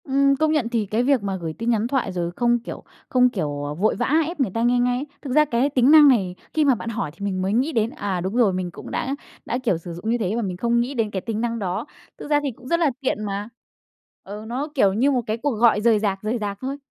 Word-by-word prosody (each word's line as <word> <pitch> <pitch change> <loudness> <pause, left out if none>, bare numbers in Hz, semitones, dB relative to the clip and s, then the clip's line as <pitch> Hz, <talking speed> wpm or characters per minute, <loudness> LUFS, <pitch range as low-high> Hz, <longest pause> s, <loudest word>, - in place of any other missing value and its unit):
Ừm, 275 0 +3
công 310 +2 +1
nhận 290 -7 +1
thì 230 -3 0
cái 215 +4 0
việc 265 -4 +2
mà 195 -1 -2
gửi 160 -1 -4
tin 230 +7 -3
nhắn 225 -1 +1
thoại 255 -6 -1
rồi 175 -2 -2
không, 240 0 +2
kiểu, 235 - -8 0.3
không, 250 -1 +4
kiểu, 145 -10 -3
ờ, 145 0 -3
vội 195 +8 +1
vã 245 +2 -1 0.2
ép 340 -1 -6
người 250 -8 +1
ta 230 - -1
nghe 245 +1 +3
ngay, 245 +2 0 0.2
thực 265 -3 -4
ra 305 +1 +5
cái 260 0 +1
tính 260 -1 +3
năng 305 -2 +9
này, 195 -9 +3 0.2
khi 310 -1 +2
mà 270 -3 +4
bạn 230 - -6
hỏi 215 -9 -3
thì 200 +4 -7
mình 190 -2 -2
mới 190 +2 0
nghĩ 260 +7 +1
đến, 225 -5 +1
à, 195 -5 -3
đúng 190 +5 -3
rồi, 230 -6 +3
mình 180 -1 -3
cũng - - -10
đã 270 +2 -2 0.3
đã, 245 - -1
kiểu, 205 -9 +1
sử 170 +1 -8
dụng 175 +6 -5
như 235 - +2
thế 210 -2 -1
mà 235 - 0
mình 185 -4 -3
không 235 +4 +1
nghĩ 245 +4 -1
đến 225 -5 -1
cái 190 - -3
tính 220 +1 -3
năng 235 -1 -2
đó. 185 +2 -2 0.3
Thực - - -8
ra 295 -1 +4
thì 280 - -1
cũng 250 +2 -14
rất 335 +3 +1
là 320 -5 +3
tiện 260 -5 -1
mà, 205 +1 -4 0.7
ừ, 205 +2 -8
nó 260 +6 -3
kiểu 200 -8 +4
như 255 +8 +2
một 255 -3 +1
cái 215 +1 -1
cuộc 280 +5 -1
gọi 225 -2 +3
rời 225 -1 +4
rạc, 195 -2 -1
rời 220 +3 -1
rạc 205 -2 -4
thôi. 270 +2 -3
230 Hz, 285 wpm, -23 LUFS, 200-260 Hz, 0.7 s, năng